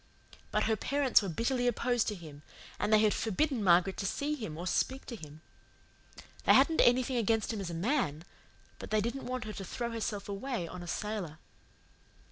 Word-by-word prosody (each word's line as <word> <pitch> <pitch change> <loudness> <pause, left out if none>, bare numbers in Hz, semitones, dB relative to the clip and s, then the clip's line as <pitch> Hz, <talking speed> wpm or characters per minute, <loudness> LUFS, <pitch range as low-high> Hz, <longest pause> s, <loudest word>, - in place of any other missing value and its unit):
But - - +1
her 220 0 +2
parents 275 +3 +3
were 200 - -3
bitterly 245 +7 0
opposed 245 0 +1
to 210 - -1
him, 155 -5 -11 0.4
and 210 - 0
they 215 - +7
had 215 -1 +4
forbidden 235 +3 0
Margaret 180 +1 +4
to 195 - -2
see 285 +8 -1
him 215 - -5
or 175 - -5
speak 265 +8 0
to 240 - -6
him. 155 -5 -11 1.0
They - - +7
hadn't 325 -1 +5
anything 250 +1 +3
against 225 0 +1
him 210 - -3
as 185 - -4
a 170 - -5
MAN, 175 - 0 0.6
but - - -8
they 215 - +2
didn't 235 +6 -3
want 255 -1 -3
her 215 0 -6
to 195 - -6
throw 235 +6 -4
herself 210 -3 -3
away 200 -2 -3
on 180 +2 -8
a 175 - -8
sailor. 200 -6 -4
215 Hz, 195 wpm, -31 LUFS, 185-245 Hz, 1.0 s, they